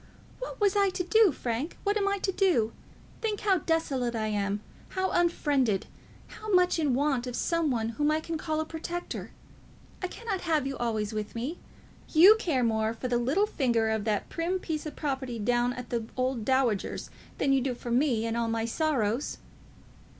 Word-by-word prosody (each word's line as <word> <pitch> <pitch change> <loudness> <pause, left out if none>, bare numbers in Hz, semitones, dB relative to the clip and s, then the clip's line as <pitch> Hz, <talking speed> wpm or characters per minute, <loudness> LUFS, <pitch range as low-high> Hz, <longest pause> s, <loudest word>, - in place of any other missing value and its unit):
"What - - -6
was 410 -1 +3
I 400 -1 +4
to 375 -1 -2
do, 435 +1 +5
Frank? 250 +4 -3
What 405 0 +1
am 405 -2 +1
I 400 0 +1
to 385 0 -1
do? 350 - +2 0.5
Think 430 -2 -1
how 390 -3 +3
desolate 275 -7 0
I 215 -1 -1
am, 205 -1 -1 0.3
how 375 0 -1
unfriended, 285 - +2 0.4
how 430 - -9
much 360 -2 +4
in 290 -6 +2
want 270 -3 +1
of 245 - -4
some 335 +1 +1
one 225 -3 0
whom 295 +6 0
I 310 +1 +2
can 330 +1 -4
call 310 0 -2
a 315 - -1
protector! 340 +2 -5 0.7
I 365 - -1
cannot 410 -1 -4
have 315 -5 +1
you 270 0 -2
always 220 -3 -1
with 215 +1 -4
me. 265 +9 -3 0.5
You 365 +7 +9
care 290 - +1
more 220 -1 +1
for 255 - -4
the 240 -1 +2
little 280 - +2
finger 235 - +1
of 220 -1 -1
that 210 -2 0
prim 345 +3 -1
piece 315 -4 -4
of 305 - -7
propriety 265 -5 -3
down 240 +3 +1
at 250 0 -8
the 230 -2 -2
old 255 -2 0
dowager's 260 -6 0 0.3
than 275 -1 +2
you 270 - +3
do 255 -1 -1
for 240 0 -6
me 240 -3 +2
and 230 0 -1
all 235 -1 0
my 225 0 -1
sorrows." 245 -3 0
270 Hz, 195 wpm, -28 LUFS, 235-345 Hz, 0.7 s, You